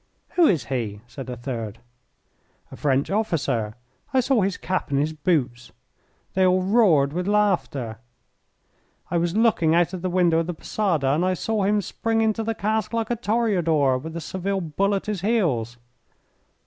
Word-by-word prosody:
"Who 345 -3 +4
is 165 -8 +2
he?" 110 -6 -3
said 125 +2 -9
a 125 - -4
third. 115 -3 -5 0.9
"A - - -8
French 140 +1 0
officer; 140 - -1 0.4
I 265 - +3
saw 255 -2 +2
his 195 0 0
cap 185 0 -2
and 140 - 0
his 155 +2 0
boots." 145 -7 -1 0.6
They 190 - +2
all 185 0 +3
roared 185 -9 +4
with 180 +2 -2
laughter. 175 - 0 1.1
"I 170 - +2
was 170 +2 -1
looking 195 -8 +3
out 175 +1 +2
of 185 - -5
the 185 - -1
window 175 -2 +3
of 165 - -1
the 175 - -3
posada 165 -7 0
and 150 +6 +2
I 185 0 +1
saw 215 +2 -1
him 205 0 +2
spring 225 +4 -1
into 220 0 +1
the 225 0 -2
cask 215 +1 -1
like 230 0 -1
a - - +2
toreador 180 - +1
with 160 +4 -8
a - - -4
Seville 190 +4 -2
bull 195 +5 0
at 195 - -3
his 210 -4 -3
heels." 155 - 0
175 Hz, 175 wpm, -24 LUFS, 140-210 Hz, 1.1 s, Who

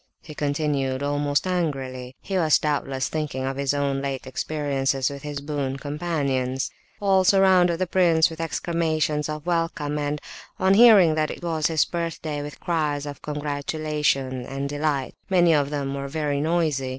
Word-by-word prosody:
he 155 - -10
continued, 145 -2 -1
almost 145 +1 0
angrily. 135 -8 -2
He 195 - -4
was 160 -5 +4
doubtless 135 -3 -1
thinking 150 -4 -3
of 135 0 -2
his 140 -1 0
own 140 -1 0
late 135 -1 -4
experiences 135 -1 -1
with 140 0 -8
his 145 -1 -5
boon 140 -2 -3
companions. 140 -4 -2 0.3
All 195 -2 +3
surrounded 185 -3 +4
the 185 - 0
prince 170 -3 +4
with 160 0 -7
exclamations 155 -2 -1
of 150 0 -5
welcome, 165 -4 -1
and, 145 0 -2 0.4
on 190 +1 +4
hearing 205 -7 +7
that 155 -1 0
it - - -7
was 160 -3 0
his 160 -3 +2
birthday, 165 -3 -3
with 145 0 -8
cries 150 -4 -1
of 145 -1 -7
congratulation 145 -3 -1
and 135 +1 -3
delight; 145 -2 -1 0.2
many 175 -3 +4
of 145 -2 +2
them 140 -2 -3
were 140 0 -4
very 145 -1 -1
noisy. 155 -5 0
150 Hz, 160 wpm, -24 LUFS, 140-165 Hz, 0.4 s, hearing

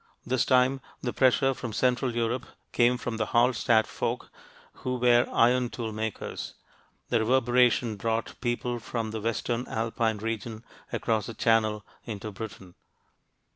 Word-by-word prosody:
This 130 0 +1
time, 130 +1 +3 0.2
the 120 - -2
pressure 135 +1 +3
from 120 -3 -6
central 125 +1 +1
Europe 120 +2 -1 0.2
came 120 +1 +3
from 120 -2 -4
the 110 -1 -1
Hallstatt 120 -2 +4
folk - - -3 0.5
who 125 0 -1
were 120 0 +4
iron 125 +1 +3
tool 115 -4 -4
makers: 110 0 -5 0.5
the 120 - +3
reverberation 120 -1 +3
brought 115 +2 -1
people 120 0 -1
from 115 -1 -4
the 110 -1 -4
western 115 +2 -1
Alpine 115 0 -1
region 110 +1 -4 0.3
across 110 -3 0
the 115 - -7
Channel 110 -2 +2 0.2
into 110 -2 -6
Britain. 95 -3 -8
115 Hz, 135 wpm, -28 LUFS, 110-125 Hz, 0.5 s, Hallstatt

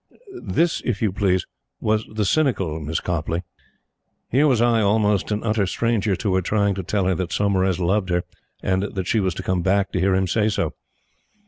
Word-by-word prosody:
This, 170 +1 0
if 115 -5 -1
you 105 - +2
please, 95 -2 +1 0.3
was 110 0 0
the 110 -1 -1
cynical 95 - +1
Miss 80 +1 -2
Copleigh. 85 0 -2 0.9
Here 140 +5 +4
was 130 -5 +3
I, 120 -1 +3
almost 105 -1 +2
an 105 0 -2
utter 105 -3 +1
stranger 110 -1 0
to 100 0 -1
her, 95 - +2
trying 100 +2 +1
to 95 - -4
tell 95 +2 -1
her 95 - +2
that 90 0 -3
Saumarez 95 -3 +1
loved 95 +2 +1
her 90 0 +1 0.4
and 95 +1 +1 0.2
she 110 - +1
was 95 -4 0
to 95 - -5
come 90 -1 0
back 95 +2 +1
to 90 - -1
hear 95 +1 +2
him 95 0 +2
say 105 +4 +1
so! 105 - -1
100 Hz, 195 wpm, -22 LUFS, 95-110 Hz, 0.9 s, Here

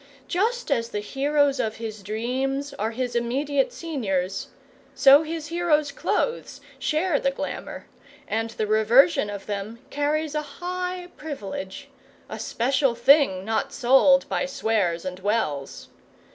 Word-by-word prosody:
Just 445 +1 -1
as 235 -4 +1
the 210 - -3
heroes 280 +5 +1
of 220 0 -1
his 220 -2 -6
dreams 260 +7 -2
are 215 +2 0
his 245 +1 -3
immediate 270 +4 0
seniors, 195 - -2 0.5
so 275 +2 +7
his 320 -1 -5
heroes' 320 -4 +1
clothes 470 +10 -2 0.2
share 310 0 +1
the 275 - +1
glamour, 280 +1 -6 0.4
and 225 +1 -1
the 220 -1 -3
reversion 220 +5 +4
of 200 -1 -6
them 205 +2 -4
carries 300 +1 -1
a 300 - 0
high 360 +4 -5
privilege 200 -10 -6 0.4
a - - -6
special 260 +1 +1
thing 235 -7 +4
not 220 +1 -1
sold 270 +2 +4
by - - -1
Swears 210 -10 0
and 185 0 -5
Wells. 190 -9 -2
270 Hz, 130 wpm, -25 LUFS, 215-295 Hz, 0.5 s, so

